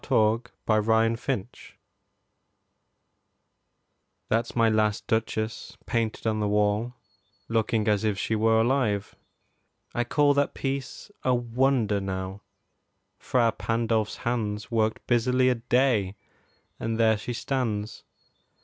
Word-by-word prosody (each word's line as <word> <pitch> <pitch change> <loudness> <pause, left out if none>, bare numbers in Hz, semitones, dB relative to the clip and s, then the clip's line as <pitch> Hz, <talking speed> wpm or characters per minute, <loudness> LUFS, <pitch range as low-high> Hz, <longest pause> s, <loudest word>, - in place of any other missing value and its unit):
MY - - +4
LAST 110 +1 +4
DUCHESS 120 - -20 0.9
Ferrara 125 - -17 2.5
That's 115 +1 0
my 115 -1 +4
last 110 -1 +1
Duchess 110 0 -2
painted 115 -2 -2
on 110 -1 +1
the 105 - 0
wall, 105 +4 +1 0.5
Looking 110 -1 0
as 105 -1 +2
if 105 -3 0
she 110 - -1
were 110 +1 +3
alive. 115 -4 0 0.8
I 120 - 0
call 145 +4 +3
That 140 0 0
piece 135 +7 -4
a 130 -1 +3
wonder, 120 -3 +1
now: 95 0 -4 0.8
Fra 120 -3 +2
Pandolf's 115 -1 -1
hands 110 -2 -2
Worked 110 -1 0
busily 125 +2 +3
a 125 - +2
day, 120 -7 +2 0.6
and 115 0 -2
there 110 -1 +4
she 105 +4 -5
stands. 110 -5 -3
115 Hz, 115 wpm, -26 LUFS, 105-120 Hz, 2.5 s, MY